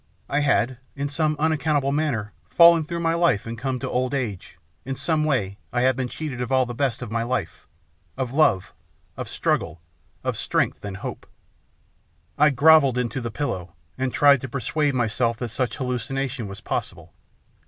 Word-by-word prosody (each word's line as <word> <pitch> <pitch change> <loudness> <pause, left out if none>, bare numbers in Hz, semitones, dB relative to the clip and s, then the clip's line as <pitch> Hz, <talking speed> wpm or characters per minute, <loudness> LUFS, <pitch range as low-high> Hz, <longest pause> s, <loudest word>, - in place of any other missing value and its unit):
I 140 - 0
had 130 -4 +1 0.2
in 140 0 -2
some 155 +1 0
unaccountable 150 -2 +1
manner 135 - -1 0.2
fallen 170 -2 +6
through 170 +2 -4
my 165 0 +1
life 170 -11 +2
and 115 0 -5
come 130 +2 -2
to - - -4
old 130 +2 -1
age, 110 -9 -4 0.3
in 135 - -4
some 155 +2 +1
way 105 -10 -1
I 120 - 0
had 130 0 +3
been 130 -1 -2
cheated 135 -2 -5
of 125 - -3
all 130 -1 +4
the 120 - -6
best 130 -2 -1
of - - -7
my 115 0 0
life, 120 -6 -3 0.5
of 130 -2 -2
love, 100 -10 +2 0.4
of - - -6
struggle, 75 - -1 0.4
of - - -1
strength, - - -1
and 100 -2 -5
hope. - - -7 1.1
I 150 +1 +5
grovelled 140 -2 +5
into 125 +1 -2
the 115 - -3
pillow 95 - -4 0.2
and 130 0 -2
tried 140 -2 +5
to 130 - -6
persuade 140 +3 -1
myself 115 -1 0
that 120 0 -4
such 120 0 -2
hallucination 130 -1 -3
was 100 0 -9
possible. - - -5
130 Hz, 175 wpm, -24 LUFS, 115-145 Hz, 1.1 s, fallen